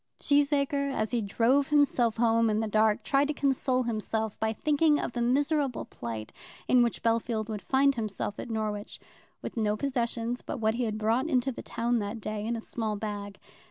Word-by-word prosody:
Cheesacre, 285 Hz, -1 st, +2 dB
as 220 Hz, -5 st, -2 dB
he 240 Hz, -2 st, +1 dB
drove 240 Hz, +7 st, +2 dB
himself 265 Hz, -6 st, +3 dB
home 230 Hz, -1 st, +3 dB
in 215 Hz, 0 st, +1 dB
the 220 Hz, -, -1 dB
dark, 215 Hz, 0 st, +2 dB
tried 280 Hz, 0 st, +2 dB
to 300 Hz, -, -2 dB
console 260 Hz, -2 st, +1 dB
himself 220 Hz, -1 st, -2 dB
by 220 Hz, 0 st, +1 dB
thinking 300 Hz, +5 st, +2 dB
of -, -, -3 dB
the 240 Hz, -, -3 dB
miserable 280 Hz, +2 st, +1 dB
plight 110 Hz, -2 st, -7 dB, 0.3 s
in 250 Hz, -, +5 dB
which 235 Hz, -1 st, 0 dB
Bellfield 230 Hz, -1 st, 0 dB
would 210 Hz, -2 st, -4 dB
find 275 Hz, +1 st, +3 dB
himself 215 Hz, -3 st, -4 dB
at -, -, -6 dB
Norwich, 215 Hz, -2 st, -3 dB, 0.4 s
with -, -, -6 dB
no 210 Hz, -1 st, +1 dB
possessions 240 Hz, -2 st, -2 dB
but -, -, -5 dB
what 220 Hz, 0 st, +2 dB
he 245 Hz, +1 st, -1 dB
had 215 Hz, -1 st, -2 dB
brought 225 Hz, +6 st, +1 dB
into 265 Hz, -2 st, +1 dB
the -, -, -7 dB
town 235 Hz, +1 st, -1 dB
that 210 Hz, +2 st, -4 dB
day 215 Hz, 0 st, -4 dB
in 235 Hz, -, -1 dB
a 225 Hz, -, -6 dB
small 220 Hz, -3 st, -3 dB
bag. 205 Hz, -1 st, -5 dB
230 Hz, 195 wpm, -28 LUFS, 215-270 Hz, 0.4 s, in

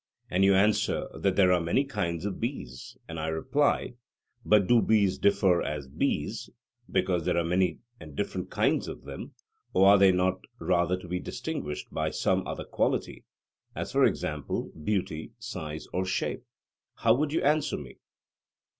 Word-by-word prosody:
and 95 Hz, +2 st, +3 dB
you 100 Hz, 0 st, +5 dB
answer 105 Hz, +2 st, +2 dB
that 95 Hz, -1 st, 0 dB
there 95 Hz, -2 st, +5 dB
are 90 Hz, -, +2 dB
many 85 Hz, +11 st, +2 dB
kinds 95 Hz, -, -3 dB
of 105 Hz, -, -3 dB
bees, 120 Hz, 0 st, -5 dB
and 80 Hz, -1 st, -6 dB
I 80 Hz, -, -2 dB
reply: 120 Hz, -, +1 dB, 0.5 s
But 105 Hz, -3 st, +4 dB
do 120 Hz, +3 st, +5 dB
bees 100 Hz, -4 st, +2 dB
differ 95 Hz, -3 st, +3 dB
as 75 Hz, -2 st, -4 dB
bees, 65 Hz, -, -2 dB, 0.4 s
because 90 Hz, -3 st, +1 dB
there -, -, 0 dB
are 85 Hz, -, +2 dB
many 90 Hz, -1 st, +1 dB, 0.2 s
and 75 Hz, -3 st, -11 dB
different -, -, -3 dB
kinds -, -, +1 dB
of -, -, -7 dB
them; -, -, -8 dB, 0.4 s
or 95 Hz, +1 st, +5 dB
are 100 Hz, 0 st, +7 dB
they 95 Hz, -1 st, +7 dB
not 95 Hz, 0 st, +1 dB, 0.2 s
rather 90 Hz, -2 st, +1 dB
to 90 Hz, -, -11 dB
be 90 Hz, +1 st, -2 dB
distinguished 75 Hz, -4 st, -5 dB
by -, -, 0 dB
some -, -, 0 dB
other -, -, -5 dB
quality, -, -, -1 dB, 0.5 s
as -, -, -4 dB
for -, -, +3 dB
example 75 Hz, -3 st, -1 dB
beauty, 80 Hz, -1 st, -3 dB
size, 75 Hz, 0 st, -6 dB
or 90 Hz, -, 0 dB
shape? 95 Hz, -, -2 dB, 0.5 s
How -, -, +4 dB
would 145 Hz, +3 st, 0 dB
you 160 Hz, -, 0 dB
answer 150 Hz, +1 st, +2 dB
me? -, -, -10 dB
95 Hz, 165 wpm, -28 LUFS, 85-105 Hz, 0.5 s, are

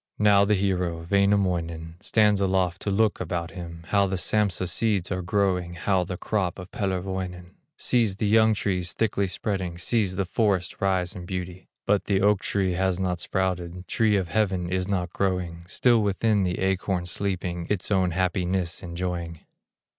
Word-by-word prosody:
Now 100 Hz, -1 st, +5 dB
the 105 Hz, +1 st, +3 dB
hero, 90 Hz, -4 st, -1 dB
Wainamoinen, 90 Hz, -5 st, +1 dB
Stands 105 Hz, -2 st, +3 dB
aloft 95 Hz, -2 st, +1 dB
to -, -, -2 dB
look 105 Hz, +1 st, +2 dB
about 85 Hz, 0 st, -3 dB
him, 85 Hz, -2 st, -8 dB
How 100 Hz, -1 st, +3 dB
the 95 Hz, 0 st, -2 dB
Sampsa 95 Hz, -2 st, +1 dB
seeds 100 Hz, -1 st, +1 dB
are 90 Hz, 0 st, -1 dB
growing, 90 Hz, -2 st, 0 dB
How 95 Hz, +1 st, +1 dB
the 90 Hz, +1 st, -5 dB
crop 95 Hz, -4 st, -1 dB
of 90 Hz, 0 st, -9 dB
Pellerwoinen; 95 Hz, -2 st, -3 dB, 0.3 s
Sees 115 Hz, -6 st, +1 dB
the 105 Hz, -, -2 dB
young 110 Hz, +1 st, +4 dB
trees 95 Hz, -5 st, -1 dB
thickly 100 Hz, -3 st, 0 dB
spreading, 95 Hz, -3 st, -3 dB
Sees 95 Hz, +1 st, 0 dB
the 95 Hz, 0 st, 0 dB
forest 95 Hz, -3 st, 0 dB
rise 95 Hz, -2 st, +1 dB
in 90 Hz, -1 st, -8 dB
beauty; 90 Hz, -1 st, -5 dB, 0.2 s
But 100 Hz, -1 st, +2 dB
the 100 Hz, -2 st, +2 dB
oak 100 Hz, 0 st, +3 dB
tree 95 Hz, -3 st, 0 dB
has 95 Hz, 0 st, 0 dB
not 90 Hz, -2 st, -1 dB
sprouted, 90 Hz, -1 st, -2 dB
Tree 110 Hz, -2 st, +2 dB
of 95 Hz, -4 st, 0 dB
heaven 95 Hz, -5 st, 0 dB
is 95 Hz, 0 st, 0 dB
not 90 Hz, -3 st, -2 dB
growing, 90 Hz, -3 st, -2 dB
Still 120 Hz, +3 st, +3 dB
within 105 Hz, +1 st, +1 dB
the 90 Hz, -2 st, 0 dB
acorn 95 Hz, -1 st, 0 dB
sleeping, 90 Hz, -2 st, -2 dB
Its 105 Hz, -1 st, -1 dB
own 95 Hz, -2 st, +3 dB
happiness 90 Hz, 0 st, -1 dB
enjoying. 85 Hz, -2 st, -4 dB
95 Hz, 165 wpm, -25 LUFS, 90-100 Hz, 0.3 s, Now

